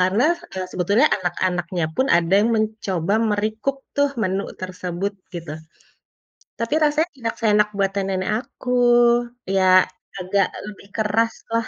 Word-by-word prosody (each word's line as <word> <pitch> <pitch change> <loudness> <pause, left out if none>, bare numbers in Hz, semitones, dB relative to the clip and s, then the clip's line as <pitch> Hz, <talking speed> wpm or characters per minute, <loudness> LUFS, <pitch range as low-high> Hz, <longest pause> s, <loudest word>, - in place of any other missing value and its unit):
karena, 190 +7 +3 0.3
eee, 185 -1 -3
sebetulnya 200 - +3
anak-anaknya 175 -1 -1
pun 260 - +2
ada 170 +1 0
yang 225 - +2
mencoba 205 -4 -1
me-recook 215 +6 -1 0.2
tuh 285 0 +3
menu 190 +1 0 0.2
tersebut 185 +1 -3 0.2
gitu. 165 -3 -6 1.1
Tapi 230 +5 -2
rasanya 305 +3 +2
tidak 230 -2 -3
seenak 210 -2 +3
buatan 195 0 0
nenek 185 +1 -2 0.2
aku, 250 -2 -6 0.7
ya 185 -1 +5 0.4
agak 190 +2 +1 0.2
lebih 200 -1 -10
keras 225 +1 +1 0.2
lah. 230 -1 0
200 Hz, 130 wpm, -22 LUFS, 185-225 Hz, 1.1 s, ya